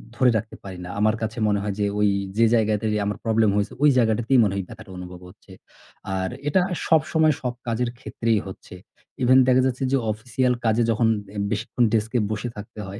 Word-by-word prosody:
ধরে 130 0 +4
রাখতে 110 +1 -6
পারি 95 -2 -8
না। - - -8
আমার 110 +1 +3
কাছে 110 +1 -4
মনে 105 -1 +1
হয় 105 -1 -2
যে 105 - +1
ওই 105 - +4 0.3
যে 115 - +5
জায়গাতে 110 -2 +1 0.2
আমার 105 0 -2
problem 110 -1 +3
হয়েছে 100 -1 -1
ওই 150 - +7
জায়গাটাতেই 120 +2 +3
মনে 100 - 0
হয় 100 - -2
ব্যথাটা 95 - -12
অনুভব 90 0 -9
হচ্ছে। - - -19 0.6
আর 95 0 -1 0.2
এটা 180 +5 +3 0.3
সবসময় 160 -1 +3
সব 125 -2 -2
কাজের 120 +1 -1
ক্ষেত্রেই 115 -4 -1
হচ্ছে। 95 -1 -10 0.5
even 130 +1 +5
দেখা 130 0 +5
যাচ্ছে 130 0 -1
যে 135 - +3
official 125 +3 -1
কাজে 110 +1 +2
যখন 115 +1 +2 0.3
এ - - -6
বেশিক্ষণ 115 +3 -1
desk 110 0 0
এ - - +3
বসে 110 +3 -3
থাকতে 105 +1 -10
হয়। 100 +3 -8
110 Hz, 200 wpm, -23 LUFS, 105-125 Hz, 0.6 s, ওই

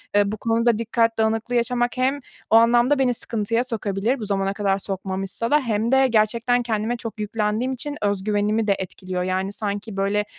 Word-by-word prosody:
eee, 205 -1 +3
bu 215 - -4
konuda 230 +1 +1
dikkat 230 0 +1
dağınıklığı 225 +2 0
yaşamak 240 +1 0
hem 265 +3 +1 0.3
o - - +4
anlamda 240 +4 +5
beni 255 -2 +3
sıkıntıya 230 0 -1
sokabilir, 220 +1 -2
bu 215 - -4
zamana 195 -1 0
kadar 200 -1 0
sokmamışsa 195 +3 -4
da 300 - +5
hem 230 -3 -1
de 265 0 +5
gerçekten 235 +2 +2
kendime 225 +1 -1
çok 230 -2 -7
yüklendiğim 215 +3 -1
için 285 +3 -4
özgüvenimi 205 +2 0
de 200 - +3
etkiliyor. 185 -1 -4
Yani, 185 +1 -1
sanki, 205 0 -5
böyle, 200 +1 +1
220 Hz, 175 wpm, -23 LUFS, 205-240 Hz, 0.3 s, anlamda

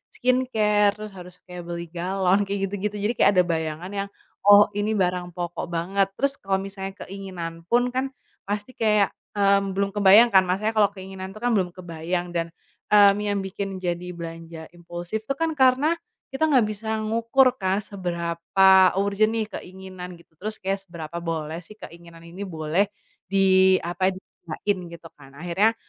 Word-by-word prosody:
skincare, 215 -5 +2
terus 215 -1 -8
harus 180 -1 -11
kayak 180 -1 -8
beli 170 0 -4
galon 185 +2 +1
kayak 200 0 -1
gitu-gitu. 205 +1 -3
Jadi 210 +3 0
kayak - - +6
ada 180 - +6
bayangan 160 +1 -3
yang, 200 0 -3 0.3
"Oh, 205 +1 +8
ini 210 +1 -1
barang 180 -1 0
pokok 175 -1 -4
banget," 190 +4 0
terus 280 +2 +1
kalau 195 0 0
misalnya 195 0 -6
keinginan 185 -4 -7
pun 245 +1 +2
kan 260 +1 0 0.4
pasti 205 +4 -3
kayak, 210 -4 +2 0.2
mmm, 200 -1 +2
belum 200 0 0
kebayang 205 +3 +6
kan 190 -1 +5
maksudnya 200 +5 0
kalau 210 -2 +4
keinginan 190 0 -8
itu - - -9
kan 245 - +2
belum 190 -4 +1
kebayang 175 0 -4
dan, 170 -1 -2 0.4
mmm, 205 -1 +6
yang 205 -1 -1
bikin 195 0 -5
jadi 175 0 -2
belanja 165 -1 -8
impulsif 175 +5 -6
itu 275 - -1
kan 330 +1 0
karena 265 +2 +4 0.4
kita 270 +4 +1
nggak 260 -5 +5
bisa 220 +1 -3
ngukur 230 +4 +3
kan 190 0 +1
seberapa 185 +1 +3
urgent 200 +2 +2
nih 220 -2 -1
keinginan 185 -1 -10
gitu. 170 - -23
Terus 215 +3 -4
kayak 195 +1 -2
seberapa 170 -1 -7
boleh 160 -1 -3
sih 215 - -14
keinginan 170 -1 -13
ini 175 +4 -8
boleh 165 +3 0 0.4
diapain, 190 -1 +3
di 190 - -11 0.3
gunain 195 +5 -1 0.2
gitu 170 0 -13
kan, 135 -1 -16
akhirnya, 180 +8 +1
190 Hz, 165 wpm, -24 LUFS, 175-210 Hz, 0.4 s, Oh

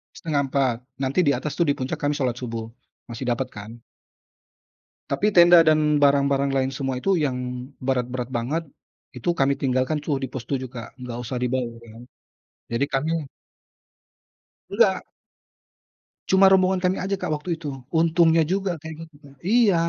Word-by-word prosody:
03:30. 140 -5 0 0.2
Nanti 135 +5 -1
di 145 - +4
atas 150 - -4
tuh, 170 - +3
di 140 - +2
puncak 130 0 -4
kan 145 0 0
Salat 130 -4 -1
Subuh, 115 -2 -5 0.4
masih 120 +2 -5
dapat 125 +1 -1
kan. 105 +2 -9 1.3
Tapi 195 +10 +1
tenda 175 -3 +7
dan 155 -2 +3
barang-barang 140 -1 +3
lain 135 -1 0
semua 135 -1 -2
itu 195 +10 +1
yang 130 -3 -1 0.5
berat-berat 125 -1 -1
banget, 140 +8 -2 0.5
itu 125 +6 -3
kami 135 0 +3
tinggalkan 130 +3 +1
tuh 145 -1 -1
di - - -1
pos 125 -3 -5
7, 130 -2 -1
Kak. 115 +1 -9
Enggak 125 -2 -6
usah 125 +2 -4
dibawa 125 -2 -2 0.2
kan, 115 - -12 0.7
jadi 115 +4 +1
kami 145 +4 0 1.6
Enggak. 195 -2 +2 1.2
Cuma 190 0 +6
rombongan 190 -1 +3
kami 185 +1 +2
aja, 195 +2 -2
Kak, 180 - -2
waktu 150 +4 -9
itu. 155 - -5 0.3
Untungnya 165 0 +4
juga 195 0 0
kayak 160 0 -7
gitu 160 -2 -22
kan, 140 -1 -15
iya. 215 -1 +4
140 Hz, 155 wpm, -24 LUFS, 130-165 Hz, 1.6 s, tenda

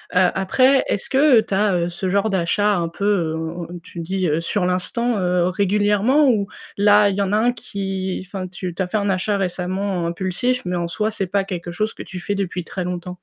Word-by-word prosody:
Heu, 180 -1 +5
après, 255 +8 +3
est-ce 200 - -1
que 270 -3 +5
tu 200 - -6
as, 200 0 +2
heu, 170 0 0
ce 185 +2 -3
genre 200 +3 +1
d'achat 200 +3 +1
un 170 -2 0
peu, 185 +4 -5 0.3
heu, 165 +1 -5 0.2
tu 175 - -10
dis, 185 +2 -1
heu: 155 +1 +1
«Sur 180 +2 -1
l'instant». 215 +6 0
Heu, 180 -1 +2
régulièrement, 205 +8 +2
ou 205 -4 +1 0.3
là, 205 0 +5
il 190 - -2
y - - +1
en 195 0 0
a 210 - +4
un 240 +3 +3
qui 195 -5 -4
enfin, 190 -1 -5
tu 180 -1 -6
as 185 - 0
fait 215 - -1
un 200 -1 0
achat 195 +2 0
récemment 185 -1 -2
impulsif, 190 +9 -1
mais 180 0 -1
en 170 -1 -1
soi, 215 +5 -1
c'est 195 -3 -2
pas 195 +2 +1
quelque 175 -3 -5
chose 215 +5 -2
que - - -8
tu 185 - -8
fais 205 - -2
depuis 185 -3 -3
très 180 +2 -5
longtemps. 180 0 -5
190 Hz, 220 wpm, -21 LUFS, 180-205 Hz, 0.3 s, Heu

